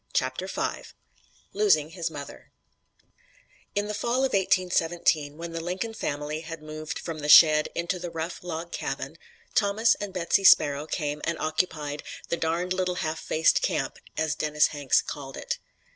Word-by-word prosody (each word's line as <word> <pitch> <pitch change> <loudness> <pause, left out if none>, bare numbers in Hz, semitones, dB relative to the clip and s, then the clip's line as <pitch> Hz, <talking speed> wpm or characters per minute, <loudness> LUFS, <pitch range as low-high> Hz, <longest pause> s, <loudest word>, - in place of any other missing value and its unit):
CHAPTER - - -1
V - - -3 0.7
LOSING 185 -7 +3
HIS 170 -1 -3
MOTHER 145 -3 -9 1.3
In 205 0 +1
the 210 - -3
fall 240 +5 +1
of 265 - -2
1817, 175 -5 +1
when 170 0 -6
the 165 0 -4
Lincoln 185 +6 -3
family 150 -6 -3
had 165 -1 -8
moved 155 0 -6
from 165 -2 -6
the 150 0 -4
shed 155 0 +8
into 170 +2 -1
the 175 0 -5
rough 165 +2 -5
log 170 -1 -5
cabin, - - -4 0.3
Thomas 215 +1 +3
and 205 -1 -4
Betsy 185 +2 +1
Sparrow 145 -4 +5
came 150 -2 -3
and 170 0 -1
occupied 155 -2 -2 0.3
the 170 - 0
"darned 170 +3 -1
little 185 -1 -1
half 155 +1 -2
faced 160 0 +2
camp," - - -1 0.2
as 155 -1 +1
Dennis 150 -1 +2
Hanks 145 -3 +2
called 135 -2 -7
it. - - -3
165 Hz, 160 wpm, -27 LUFS, 155-180 Hz, 1.3 s, shed